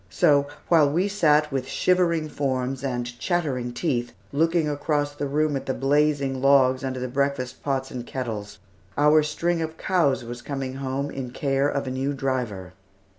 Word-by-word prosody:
So, 140 Hz, +8 st, +3 dB, 0.2 s
while 155 Hz, -4 st, +5 dB
we 175 Hz, +7 st, +1 dB
sat 155 Hz, -7 st, +3 dB
with 135 Hz, -1 st, -2 dB
shivering 170 Hz, -3 st, +1 dB
forms 135 Hz, -2 st, -2 dB
and 125 Hz, -3 st, -2 dB
chattering 140 Hz, -9 st, -1 dB
teeth 120 Hz, -3 st, -2 dB, 0.2 s
looking 165 Hz, +2 st, +2 dB
across 145 Hz, 0 st, -1 dB
the 145 Hz, 0 st, -3 dB
room 150 Hz, +1 st, +1 dB
at 135 Hz, -, -4 dB
the 130 Hz, -, -1 dB
blazing 140 Hz, -1 st, +1 dB
logs 130 Hz, -1 st, +4 dB
under 130 Hz, -1 st, -3 dB
the 130 Hz, -, -3 dB
breakfast 135 Hz, -1 st, -2 dB
pots 135 Hz, -2 st, -2 dB
and 125 Hz, -1 st, -5 dB
kettles, 110 Hz, -5 st, -5 dB, 0.4 s
our 150 Hz, +2 st, +5 dB
string 165 Hz, +3 st, -1 dB
of 160 Hz, 0 st, -4 dB
cows 150 Hz, -9 st, +1 dB
was 120 Hz, +1 st, -7 dB
coming 135 Hz, -2 st, -4 dB
home 135 Hz, +1 st, -3 dB
in 130 Hz, -2 st, -5 dB
care 135 Hz, +2 st, 0 dB
of 140 Hz, -, -2 dB
a 130 Hz, -, -3 dB
new 135 Hz, +2 st, -1 dB
driver. 120 Hz, -, -3 dB
140 Hz, 170 wpm, -25 LUFS, 130-150 Hz, 0.4 s, while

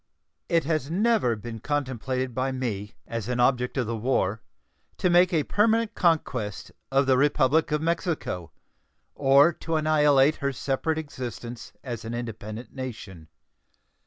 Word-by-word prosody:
It 165 Hz, -2 st, +3 dB
has 155 Hz, -2 st, -1 dB
never 200 Hz, -, +2 dB
been 115 Hz, +1 st, -7 dB
contemplated 130 Hz, -2 st, -2 dB
by 130 Hz, +2 st, -1 dB
me, 110 Hz, -6 st, -4 dB
as 115 Hz, -1 st, -5 dB
an 125 Hz, 0 st, -1 dB
object 125 Hz, +1 st, +2 dB
of 130 Hz, -, +1 dB
the 115 Hz, +1 st, -3 dB
war, 110 Hz, -3 st, 0 dB, 0.6 s
to 180 Hz, -, +1 dB
make 175 Hz, +1 st, +5 dB
a 160 Hz, -4 st, +2 dB
permanent 225 Hz, +4 st, +2 dB
conquest 130 Hz, -, 0 dB, 0.2 s
of 135 Hz, +1 st, +3 dB
the 130 Hz, -1 st, +3 dB
Republic 145 Hz, +2 st, +3 dB
of 150 Hz, +1 st, 0 dB
Mexico 165 Hz, -, -2 dB, 0.6 s
or 140 Hz, +4 st, +5 dB
to 165 Hz, +1 st, -4 dB
annihilate 150 Hz, -2 st, +4 dB
her 140 Hz, -1 st, -1 dB
separate 135 Hz, +4 st, -1 dB
existence 125 Hz, -5 st, -6 dB
as 120 Hz, -4 st, -5 dB
an 115 Hz, +1 st, -5 dB
independent 115 Hz, -1 st, -6 dB
nation. 105 Hz, -11 st, -7 dB
130 Hz, 140 wpm, -26 LUFS, 120-155 Hz, 0.6 s, make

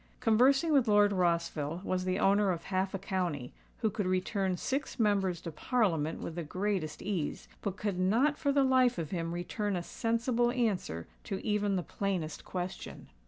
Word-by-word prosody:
Conversing 260 Hz, +7 st, +4 dB
with 265 Hz, -5 st, +4 dB
Lord 205 Hz, -1 st, +5 dB
Rossville 170 Hz, -3 st, 0 dB
was 185 Hz, -1 st, -1 dB
the 185 Hz, 0 st, 0 dB
owner 200 Hz, +1 st, +3 dB
of 175 Hz, -3 st, -1 dB
half 190 Hz, 0 st, -1 dB
a -, -, 0 dB
county, 180 Hz, -9 st, -3 dB, 0.3 s
who 220 Hz, -2 st, +2 dB
could 200 Hz, -1 st, -2 dB
return 185 Hz, 0 st, 0 dB
six 270 Hz, +3 st, -3 dB
Members 195 Hz, -5 st, +2 dB
to 170 Hz, -, -6 dB
Parliament 165 Hz, -, 0 dB
with 170 Hz, -, -5 dB
the 170 Hz, -, -4 dB
greatest 185 Hz, -1 st, -2 dB
ease, 185 Hz, -7 st, -3 dB
but 200 Hz, -2 st, -3 dB
could 200 Hz, -4 st, -2 dB
not 235 Hz, +11 st, +3 dB
for 285 Hz, -1 st, 0 dB
the 280 Hz, 0 st, +4 dB
life 255 Hz, -2 st, +4 dB
of 160 Hz, -3 st, -4 dB
him 165 Hz, -2 st, -2 dB
return 195 Hz, +4 st, -2 dB
a 175 Hz, -, -2 dB
sensible 230 Hz, +4 st, 0 dB
answer 205 Hz, -, -1 dB, 0.2 s
to 195 Hz, -, -3 dB
even 210 Hz, -2 st, +1 dB
the 180 Hz, -, -1 dB
plainest 180 Hz, -6 st, -3 dB
question. 180 Hz, 0 st, -6 dB
195 Hz, 175 wpm, -31 LUFS, 175-225 Hz, 0.3 s, Lord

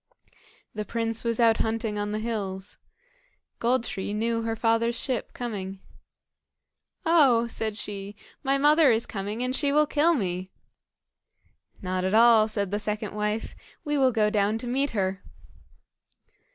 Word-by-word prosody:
The 210 Hz, -, -3 dB
prince 225 Hz, +1 st, -2 dB
was 230 Hz, -1 st, -1 dB
out 230 Hz, -1 st, +5 dB
hunting 220 Hz, -1 st, -1 dB
on 205 Hz, 0 st, -2 dB
the 210 Hz, -, -2 dB
hills. 205 Hz, -4 st, -4 dB, 0.8 s
Gold 245 Hz, +1 st, +1 dB
tree 205 Hz, -2 st, -4 dB
knew 230 Hz, +1 st, 0 dB
her 225 Hz, 0 st, -2 dB
father's 230 Hz, +1 st, +1 dB
ship 255 Hz, -4 st, -3 dB
coming. 195 Hz, -5 st, -5 dB, 1.3 s
"Oh!" 280 Hz, -9 st, +5 dB
said 220 Hz, -2 st, -3 dB
she, 205 Hz, -1 st, -6 dB, 0.3 s
"my 275 Hz, -1 st, +1 dB
mother 295 Hz, 0 st, +5 dB
is 225 Hz, +1 st, +1 dB
coming, 205 Hz, +4 st, -4 dB
and 255 Hz, +1 st, -1 dB
she 285 Hz, -1 st, +1 dB
will 300 Hz, +1 st, +4 dB
kill 310 Hz, +3 st, +2 dB
me." 185 Hz, -5 st, -3 dB, 1.3 s
"Not 185 Hz, 0 st, -2 dB
at 190 Hz, +3 st, +1 dB
all," 225 Hz, -1 st, +6 dB
said 200 Hz, -3 st, -3 dB
the 205 Hz, -, -1 dB
second 210 Hz, 0 st, -3 dB
wife; 210 Hz, +1 st, -2 dB, 0.3 s
"we 295 Hz, 0 st, 0 dB
will 265 Hz, -2 st, +4 dB
go 215 Hz, -2 st, +2 dB
down 210 Hz, +1 st, +1 dB
to 245 Hz, -, -7 dB
meet 270 Hz, +4 st, 0 dB
her." 195 Hz, -3 st, -2 dB
225 Hz, 150 wpm, -26 LUFS, 205-245 Hz, 1.3 s, all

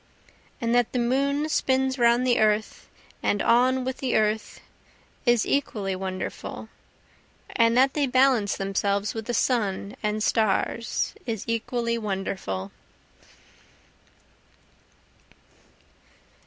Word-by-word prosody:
And 230 Hz, -2 st, 0 dB
that 245 Hz, -2 st, +2 dB
the -, -, 0 dB
moon 275 Hz, +5 st, +1 dB
spins 265 Hz, -3 st, 0 dB
round 235 Hz, +1 st, +4 dB
the 245 Hz, -1 st, +3 dB
earth 215 Hz, 0 st, 0 dB, 0.3 s
and 205 Hz, -, +1 dB
on 255 Hz, +4 st, +3 dB
with 260 Hz, 0 st, -3 dB
the 260 Hz, -2 st, -1 dB
earth, 215 Hz, 0 st, 0 dB, 0.7 s
is 240 Hz, -2 st, +4 dB
equally 210 Hz, -9 st, -1 dB
wonderful, 185 Hz, 0 st, -6 dB, 0.9 s
And 230 Hz, 0 st, +3 dB
that 265 Hz, +1 st, +4 dB
they 290 Hz, -2 st, +1 dB
balance 255 Hz, -5 st, +3 dB
themselves 200 Hz, +1 st, -1 dB
with 225 Hz, -1 st, -5 dB
the 240 Hz, -, -2 dB
sun 205 Hz, -4 st, 0 dB
and 210 Hz, 0 st, -1 dB
stars 220 Hz, +1 st, 0 dB
is 225 Hz, -4 st, -3 dB
equally 235 Hz, 0 st, -1 dB
wonderful. 190 Hz, -, -4 dB
230 Hz, 105 wpm, -25 LUFS, 210-255 Hz, 0.9 s, round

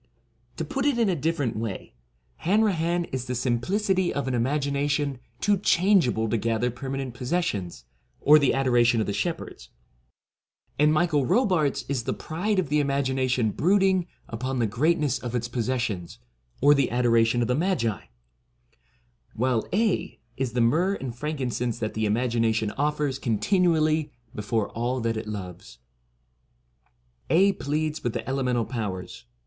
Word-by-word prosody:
To -, -, -2 dB
put 275 Hz, +1 st, -1 dB
it 280 Hz, -4 st, +2 dB
in 230 Hz, -4 st, +2 dB
a 180 Hz, -, +1 dB
different 145 Hz, -5 st, -1 dB
way, 110 Hz, -, -5 dB, 0.4 s
Hanrahan 175 Hz, -4 st, +1 dB
is 130 Hz, -1 st, -3 dB
the 125 Hz, -, -3 dB
simplicity 180 Hz, -, 0 dB
of 140 Hz, -, -3 dB
an 130 Hz, -, -1 dB
imagination 140 Hz, +2 st, 0 dB, 0.2 s
too 205 Hz, -1 st, +2 dB
change 190 Hz, -4 st, +4 dB
able 110 Hz, -2 st, 0 dB
to 110 Hz, +1 st, 0 dB
gather 115 Hz, +3 st, 0 dB
permanent 135 Hz, +1 st, -5 dB
possessions, 125 Hz, -, -3 dB, 0.3 s
or 150 Hz, +1 st, +6 dB
the 140 Hz, -, +3 dB
adoration 120 Hz, -3 st, +3 dB
of 110 Hz, -, +1 dB
the 100 Hz, -, -2 dB
shepherds; 165 Hz, -, -4 dB, 1.1 s
and 150 Hz, +1 st, +5 dB
Michael 155 Hz, -1 st, +2 dB
n 130 Hz, -, -2 dB
Robartes 180 Hz, -, +1 dB
is 135 Hz, -3 st, -1 dB
the -, -, -1 dB
pride 195 Hz, +6 st, -2 dB
of 185 Hz, -7 st, 0 dB
the 150 Hz, +1 st, +2 dB
imagination 130 Hz, -4 st, 0 dB
brood 190 Hz, -, +2 dB
ing 185 Hz, -2 st, +2 dB, 0.2 s
upon 130 Hz, +3 st, -3 dB
the 120 Hz, -, +2 dB
greatness 145 Hz, +5 st, +1 dB
of 125 Hz, -1 st, -5 dB
its 120 Hz, -1 st, -1 dB
possessions, 115 Hz, -7 st, -2 dB, 0.4 s
or 145 Hz, +2 st, +7 dB
the 140 Hz, -3 st, +2 dB
adoration 120 Hz, -1 st, +2 dB
of -, -, -2 dB
the 125 Hz, -, +1 dB
Magi; 150 Hz, -, -1 dB, 1.3 s
while 120 Hz, 0 st, 0 dB
Aedh 210 Hz, +1 st, 0 dB, 0.2 s
is 130 Hz, -3 st, -2 dB
the 125 Hz, -, +1 dB
myrrh 170 Hz, +12 st, +2 dB
and 130 Hz, -8 st, -6 dB
frankincense 125 Hz, -5 st, -2 dB
that 110 Hz, -2 st, -3 dB
the 110 Hz, 0 st, 0 dB
imagination 115 Hz, -1 st, +1 dB
offers 145 Hz, -1 st, -1 dB
continually 155 Hz, -, +1 dB, 0.2 s
before 105 Hz, 0 st, -1 dB
all 120 Hz, +3 st, -2 dB
that 115 Hz, 0 st, -1 dB
it 110 Hz, 0 st, -5 dB
loves. 90 Hz, -, -7 dB, 1.5 s
Aedh 195 Hz, +4 st, +3 dB
pleads 155 Hz, +2 st, -2 dB
with 120 Hz, -, -1 dB
the -, -, -4 dB
Elemental 125 Hz, -3 st, 0 dB
Powers. 95 Hz, -, -5 dB
130 Hz, 150 wpm, -25 LUFS, 115-160 Hz, 1.5 s, or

